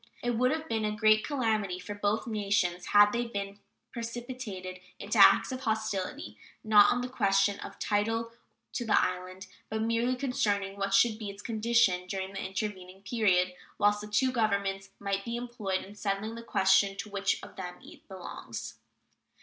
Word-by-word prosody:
It 245 - +1
would 245 +2 +2
have 315 +2 -2
been 225 -5 -1
a 210 0 -1
great 215 0 +4
calamity 220 -9 0
for 185 +3 -7
both 205 +3 -1
nations 200 -5 0
had 205 0 +6
they 240 +1 -1
been 200 -2 -5 0.3
precipitated 230 -6 -6 0.2
into 210 +2 -2
acts 200 - +7
of 255 - -4
hostility, 215 - -3 0.2
not 210 -2 +6
on 245 - 0
the 250 - -3
question 200 -4 +2
of - - -9
title 225 +2 0 0.4
to 245 - -2
the 220 - +4
island, 185 +1 -3 0.2
but 220 0 -1
merely 230 +3 +1
concerning 205 -7 -1
what 195 0 0
should 220 +1 +4
be 215 -3 -5
its 200 +1 -10
condition 220 -5 +2
during 190 +1 -4
the 195 - -4
intervening 190 -1 -5
period 185 -5 +2 0.2
whilst 205 0 +3
the 210 - -7
two 255 +5 +2
Governments 200 -4 0
might 200 -1 -2
be 235 +2 -4
employed 235 -6 -3
in 200 - -12
settling 205 +1 -3
the 230 - -7
question 195 -2 +3
to 210 - -5
which 200 0 0
of - - -11
them 180 -2 -6
it - - -15
belongs. 190 -2 -8
205 Hz, 175 wpm, -29 LUFS, 195-230 Hz, 0.4 s, acts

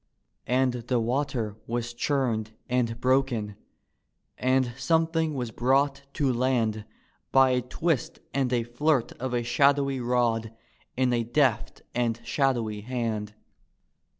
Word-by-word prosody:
And 130 +1 +2
the 125 0 -1
water 120 -3 -1
was 120 0 -3
chunied 120 -5 -1
and 120 -2 0
broken, 125 -5 +1 0.8
and 130 -1 +1
something 160 +2 +1
was 125 -3 -3
brought 135 +4 +2
to 135 -3 +1
land 115 -4 0 0.5
By 135 -1 +5
a 125 0 +2
twist 140 +3 -1 0.2
and 135 -2 0
a 120 -2 +1
flirt 125 +2 +1
of 130 -1 -2
a 120 - 0
shadowy 140 +2 +2
rod 120 -2 0 0.4
in 125 -1 +2
a 120 -1 +1
deft 120 -1 0
and 120 -1 0
shadowy 120 -7 0
hand. 110 -3 -3
125 Hz, 125 wpm, -27 LUFS, 115-135 Hz, 0.8 s, By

